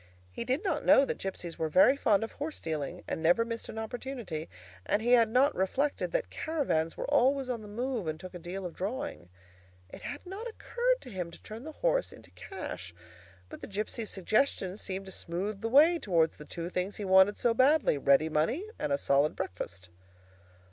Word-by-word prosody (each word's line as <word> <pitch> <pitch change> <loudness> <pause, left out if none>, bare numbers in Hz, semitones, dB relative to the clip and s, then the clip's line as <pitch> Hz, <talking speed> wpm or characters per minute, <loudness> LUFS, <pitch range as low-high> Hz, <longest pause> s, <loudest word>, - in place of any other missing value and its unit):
He - - -4
did 260 +8 0
not 390 - -1
know 275 - +6
that - - -3
gipsies 180 -3 -5
were 160 -1 0
very 275 - +6
fond 220 -6 +2
of 225 - -5
horse 300 +2 -5
dealing, 155 -4 -4
and - - -3
never 175 +8 +4
missed 230 -1 -5
an - - -7
opportunity, 220 - -5 0.3
and 205 - +1
he 235 +3 0
had 230 -3 +6
not 260 +6 +4
reflected 270 +10 0
that - - -1
caravans 260 - -1
were - - -3
always 275 -1 +2
on 240 -3 -2
the 210 - -10
move 235 -2 -3
and 155 0 -3
took 185 +1 -9
a 180 - -7
deal 180 +3 -6
of 175 - -5
drawing. 215 - -4 0.6
It - - -10
had 290 - -6
not 390 +6 -6
occurred - - -1
to 250 - -11
him 180 -3 -4
to 170 - -14
turn 225 +5 -9
the 315 - -6
horse - - +2
into - - -15
cash, 90 - -7 0.5
but - - -10
the - - -6
gipsy's 215 +2 -3
suggestion 195 -1 +1
seemed 195 -2 -5
to 190 - -8
smooth 195 +4 -4
the 225 - -1
way 315 +7 +6
towards 165 - +1
the 150 - -10
two 170 +2 -6
things 180 +3 -2
he 205 - -5
wanted 190 +2 +6
so 235 - +2
badly—ready 190 - +4
money, 165 - 0
and 145 - -2
a 140 - +3
solid 140 +2 +2
breakfast. 90 0 -6
215 Hz, 200 wpm, -30 LUFS, 170-270 Hz, 0.6 s, know